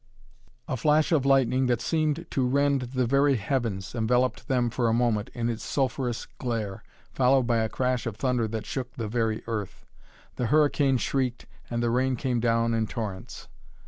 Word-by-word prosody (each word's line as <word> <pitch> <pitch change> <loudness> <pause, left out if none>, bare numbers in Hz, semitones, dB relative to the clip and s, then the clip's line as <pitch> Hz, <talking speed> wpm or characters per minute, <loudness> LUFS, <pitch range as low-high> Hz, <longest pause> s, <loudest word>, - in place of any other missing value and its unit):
A 135 - -1
flash 150 +6 +3
of 140 -5 +2
lightning 130 -1 +3
that 120 -2 +1
seemed 155 +4 0
to 130 -2 +1
rend 140 +1 +2 0.2
the 130 - +3
very 140 +3 +3
heavens 110 -5 -2
enveloped 125 +2 0
them 125 -3 +1
for 120 0 0
a - - +2
moment 115 -3 +1
in 120 -1 -1
its 115 -1 -3
sulphureous 125 -3 -1
glare, 110 -5 -3 0.3
followed 130 0 +3
by 120 -1 +1
a 110 -1 0
crash 125 -1 -1
of 115 - -4
thunder 125 -3 0
that 110 0 -4
shook 125 -2 -4
the 115 -3 -3
very 110 -1 -1
earth. 110 -4 -5 0.5
The 125 - 0
hurricane 145 -1 +3
shrieked, 125 -1 -1 0.2
and 120 0 -1
the 120 - +1
rain 130 +2 +1
came 125 0 -1
down 115 0 +1
in 110 -1 0
torrents. 105 -6 -6
125 Hz, 175 wpm, -27 LUFS, 115-135 Hz, 0.5 s, flash